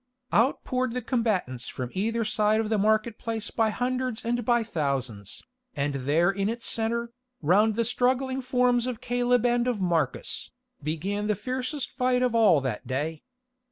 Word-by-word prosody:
Out 235 +6 +3
poured 255 -2 -1
the 250 - -2
combatants 205 - -1
from 125 -1 -5
either 225 +4 0
side 215 0 +2
of 220 -1 -1
the 220 -2 +1
market 215 +2 +1
place 225 -1 -4
by 225 -1 +2
hundreds 250 0 -2
and 240 +1 0
by 240 +1 +3
thousands, 135 - -3 0.3
and 145 0 -1
there 145 +7 +2
in 195 +1 -1
its 230 +1 -4
centre, 235 +1 0 0.3
round 205 +7 +4
the 230 0 +1
struggling 260 +2 +1
forms 250 -1 +2
of 250 -3 -3
Caleb 245 0 +1
and 240 0 +2
of 245 -4 0
Marcus, 170 -7 -1 0.3
began 185 +8 -2
the 210 - +2
fiercest 255 +5 -3
fight 250 -1 +1
of 250 -2 +1
all 210 -10 +5
that 130 -5 -4
day. 150 +4 -2
225 Hz, 165 wpm, -27 LUFS, 175-245 Hz, 0.3 s, all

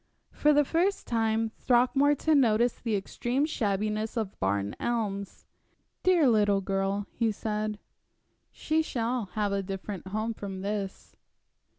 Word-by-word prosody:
For 300 - +3
the 295 0 +4
first 360 +7 0
time 225 -1 +1
Throckmorton 280 +4 +3
noticed 235 0 +2
the 225 -3 0
extreme 240 +7 -1
shabbiness 215 -4 -1
of 215 -4 -3
Barn 100 +1 -1
Elms. 205 -5 -3 0.6
"Dear 350 -6 +4
little 205 -4 +3
girl," 195 +1 -1
he 230 -2 0
said, 215 0 -3 0.7
"she 315 +1 0
shall 240 -5 -2
have 210 -2 0
a 200 0 0
different 195 0 -6
home 215 +4 -2
from 195 -3 -6
this." 200 -1 -4
220 Hz, 125 wpm, -28 LUFS, 200-245 Hz, 0.7 s, the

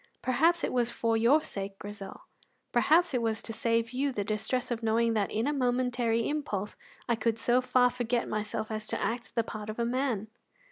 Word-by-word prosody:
Perhaps 325 +7 +3
it - - -1
was 245 -2 +2
for 230 -1 0
your 250 +8 +4
sake, 195 0 -6
Grizel; 200 -1 -8 0.5
perhaps 335 0 +4
it 250 - +1
was 225 -1 -1
to 225 - -5
save 230 0 0
you 275 +2 0
the 210 -5 -2
distress 215 +5 -2
of 235 -1 -2
knowing 230 +1 +2
that 210 -3 +1
in 220 +2 -1
a 295 - +1
momentary 245 -3 +1
impulse 210 -10 -3 0.3
I 235 - +2
could 230 -1 0
so 240 +2 +3
far 250 -1 +3
forget 240 -1 -1
myself 215 +1 -3
as 215 0 -3
to - - -2
act 235 +1 -3
the 230 - +2
part 215 -1 -7
of 215 - -5
a 235 - 0
man." 240 -4 -1
230 Hz, 200 wpm, -29 LUFS, 220-250 Hz, 0.5 s, your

